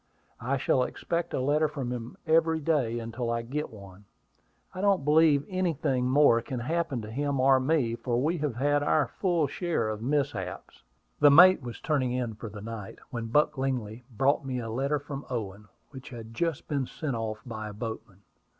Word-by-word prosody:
"I 130 +4 -1
shall 130 0 +2
expect 170 +6 -2
a - - -1
letter 150 +4 +2
from 140 -5 -4
him 120 -1 -6
every 160 0 +3
day 140 -7 0
until 115 +1 -4
I 115 0 -1
get 145 +6 -3
one. 100 -2 -13 0.7
I 185 - -5
don't 195 -8 +2
believe 150 -2 +4
anything 160 -9 0
more 130 -4 +5
can 125 0 -5
happen 145 -3 -1
to 105 - -8
him 140 +2 -1
or 130 0 +5
me, 130 -4 +1
for 120 +1 -1
we 160 +6 0
have 145 -5 -2
had 145 +3 +2
our 145 0 +2
full 175 -5 +2
share 145 -6 -1
of 110 0 -4
mishaps." 130 -8 -2 0.4
The 145 - +7
mate 180 +5 +8
was 120 -2 -7
turning 135 -5 0
in 125 -3 -2
for 110 +1 -8
the 105 0 -9
night, 110 -2 -7
when 115 -3 -4
Buck 150 +4 +2
Lingley 125 -4 -2
brought 135 +5 +1
me 130 -2 -3
a - - -4
note 140 +5 -1
from 140 -1 -6
Owen, 105 -4 -5 0.2
which 130 -2 -10
had 115 -3 -9
just 165 +2 -2
been 140 -4 -1
sent 145 -6 -4
off 110 -1 -3
by 110 -3 -6
a - - -8
boatman. 110 -2 -7
130 Hz, 190 wpm, -28 LUFS, 115-150 Hz, 0.7 s, mate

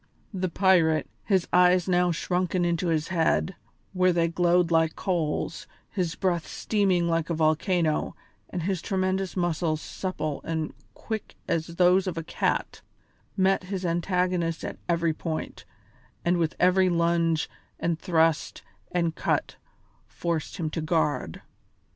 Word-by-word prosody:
The 185 -1 -1
pirate, 170 -4 +3 0.2
his 190 -4 +2
eyes 180 0 +5
now 180 -1 +3
shrunken 180 +1 0
into 170 +1 0
his 160 0 0
head, 175 +1 +1 0.4
where 185 -1 +3
they 170 -1 +2
glowed 175 0 +2
like 160 -1 +3
coals, 170 -5 -2 0.2
his 180 -5 -2
breath 175 -3 0
steaming 190 -5 +1
like 165 -1 0
a 170 - 0
volcano, 160 +1 +1 0.3
and 175 -3 -4
his 185 -1 -1
tremendous 190 -1 -1
muscles 165 -3 0
supple 155 -5 -4
and 160 -2 -3 0.2
quick 220 -2 -5
as 165 -1 0
those 180 +2 +4
of 175 -3 -3
a 165 - -2
cat, - - -1 0.6
met 190 0 +2
his 190 -1 -4
antagonist 175 -1 0
at - - -6
every 170 -1 +2
point, 160 0 -5 0.6
and 175 +1 +3
with 165 -2 0
every 185 +1 +4
lunge 170 -2 +1 0.3
and 165 -1 -1
thrust 165 -3 +1 0.3
and 170 -2 0
cut - - -1 0.5
forced 160 - -3
him 160 -4 -2
to 165 - -3
guard. 150 - -1
170 Hz, 135 wpm, -26 LUFS, 165-185 Hz, 0.6 s, eyes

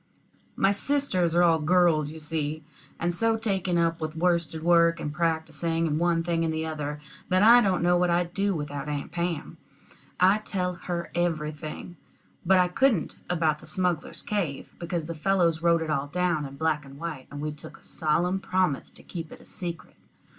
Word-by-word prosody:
My 195 - +3
sisters 200 - +1
are 175 - +5
all 165 -2 +4
girls, 160 -2 +3
you 160 - -9
see, 155 0 -3 0.4
and 175 +1 0
so 225 +5 +1
taken 195 -5 0
up 165 -1 +1
with 155 0 -3
worsted 170 -2 0
work, 170 -1 +4
and 150 - -4
practicing, 165 0 0
and 155 -1 0
one 170 -1 +2
thing 165 -1 0
and 165 - 0
the 160 0 -2
other, 150 -2 -4 0.3
that 185 +2 +3
I 235 +3 +8
don't 190 -5 +1
know 175 0 +4
what 180 0 +2
I'd 175 0 +1
do 200 0 +1
without 145 -1 -4
Aunt 145 -1 -4
Pam. 170 -3 -3 0.6
I 190 +3 +5
tell 180 -4 -2
her 170 0 -5
everything; 155 0 -3 0.5
but 190 +2 +4
I 180 0 +4
couldn't 215 - +1
about 160 -4 +1
the - - -14
smugglers' 175 0 -1
cave, 175 -10 -3
because 170 -2 -3
the 165 - -4
fellows 170 -1 +1
wrote 170 -1 +3
it 155 - -3
all 140 -1 0
down 175 -2 0
in 135 - -11
black 155 -1 0
and 135 0 -13
white, 155 -4 -6
and 145 - -8
we 150 +1 -2
took 150 - -11
a - - -23
solemn 175 +5 0
promise 185 -6 0
to - - -14
keep 165 -3 -7
it - - -11
a - - -17
secret. 170 -3 -6
170 Hz, 190 wpm, -27 LUFS, 155-180 Hz, 0.6 s, I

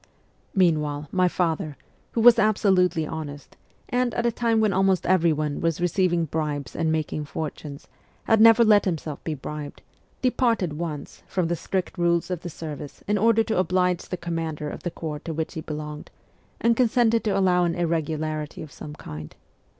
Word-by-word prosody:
Meanwhile, 150 -5 +1
my 185 -1 +3
father, 160 -4 -1 0.4
who 230 - +1
was 235 0 +8
absolutely 190 -6 +3
honest, 150 -3 -7 0.3
and, 245 -1 0
at 235 - 0
a 235 - +3
time 230 -1 +1
when 215 -2 +2
almost 190 -1 +2
every 175 -3 +4
one 150 -1 -2
was 165 -2 0
receiving 175 -1 +1
bribes 150 -4 -3
and 160 -1 0
making 155 -1 -2
fortunes, 145 -1 -6 0.4
had 220 -1 +3
never 230 +1 +8
let 210 -2 +5
himself 160 -5 -3
be 160 - -3
bribed, 150 +1 -7 0.4
departed 230 -9 +1
once 155 -2 -6
from 180 -3 -1
the 175 - +1
strict 185 +1 -3
rules 170 +1 +1
of 180 - -2
the 175 - -6
service 150 -3 -8
in 210 0 +1
order 225 +1 +4
to 220 -3 -1
oblige 180 -1 +1
the 180 - -3
commander 165 -3 -3
of - - -8
the 175 - -2
corps 155 -3 -5
to 160 +1 -6
which 160 +1 -3
he 160 - -5
belonged, 150 -1 -6 0.5
and 235 0 +3
consented 230 -1 +3
to 210 - +1
allow 180 -2 +3
an 170 -1 0
irregularity 155 -2 -2
of 155 - -11
some 150 0 -9
kind. 75 - -9
170 Hz, 175 wpm, -25 LUFS, 155-195 Hz, 0.5 s, was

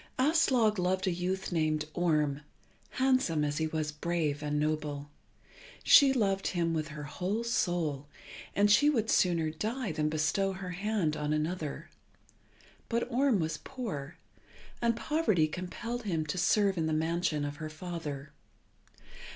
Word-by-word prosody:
Aslog 255 - +3
loved 185 +1 0
a 185 - +1
youth 185 +2 -2
named 155 -2 0
Orm, 150 -5 +1 0.5
handsome 255 - +2
as 145 +1 -2
he 160 - +1
was 155 -1 -2
brave 155 -1 -1
and 150 0 -1
noble. 150 -1 -2 0.7
She 280 -2 +8
loved 195 -6 +1
him 170 -2 0
with 155 -1 -1
her 150 -1 -7
whole 185 +9 -2
soul, 170 - -1 0.5
and 205 +1 +4
she 290 +8 +6
would 225 -7 +1
sooner 165 -4 +2
die 220 +6 -3
than 155 -1 0
bestow 155 +6 0
her 185 -1 -6
hand 195 -4 -1
on 150 0 -1
another. 155 -1 -3 1.0
But 235 +2 -1
Orm 255 -3 +3
was 160 -1 -2
poor, 170 - -6 0.6
and 235 -1 +2
poverty 230 - +1
compelled 185 +9 -5
him 170 -8 -1
to 155 +4 -3
serve 195 0 +3
in 160 - 0
the 155 - 0
mansion 160 -1 0
of 145 0 -5
her 155 -1 -5
father. 155 -4 -6
170 Hz, 145 wpm, -30 LUFS, 155-210 Hz, 1.0 s, She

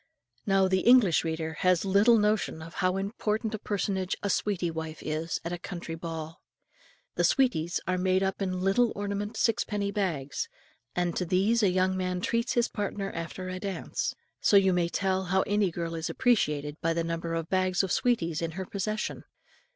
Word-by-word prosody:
Now 195 -1 +4
the 190 0 +2
English 235 -7 +5
reader 160 0 -3
has 180 0 +3
little 205 +5 +5
notion 210 -6 +1
how 180 +3 -1
important 210 +2 -2
a 215 - -3
personage 195 -2 -1
a 200 - +1
"sweetie 185 -5 0
wife" 160 -1 -6
is 155 +2 -2
at 170 - -3
a 175 - -4
country 170 -2 -6
ball. 165 -1 -6 0.8
The - - +2
"sweeties" 180 - +2
are 185 0 0
made 185 +1 +2
up 195 +1 -2
in 185 -2 -1
little 205 +5 +3
ornamented 205 +1 -3
sixpenny 210 -3 0
bags, 185 - -2 0.5
and 175 -1 0
to - - +1
these 195 +7 +2
a 200 - +4
young 185 +1 +2
man 180 -1 -1
treats 230 +5 0
his 240 -1 +2
partner 200 -1 -3
after 165 +3 -5
a 185 0 -4
dance; 195 -1 -3 0.2
so 205 - +5
you 190 -1 +4
may 175 -1 +1
tell 190 +1 0
how 190 +1 +2
any 205 -2 +1
girl 170 0 -4
is 160 -1 -3
appreciated 150 - +1
by 165 0 +1
the 165 0 0
number 165 0 -3
of 165 -1 -3
bags 185 0 +1
of 190 - -2
sweeties 170 -10 +1
in 165 -1 -2
her 190 +2 -4
possession. 215 +3 -3
185 Hz, 180 wpm, -28 LUFS, 170-205 Hz, 0.8 s, English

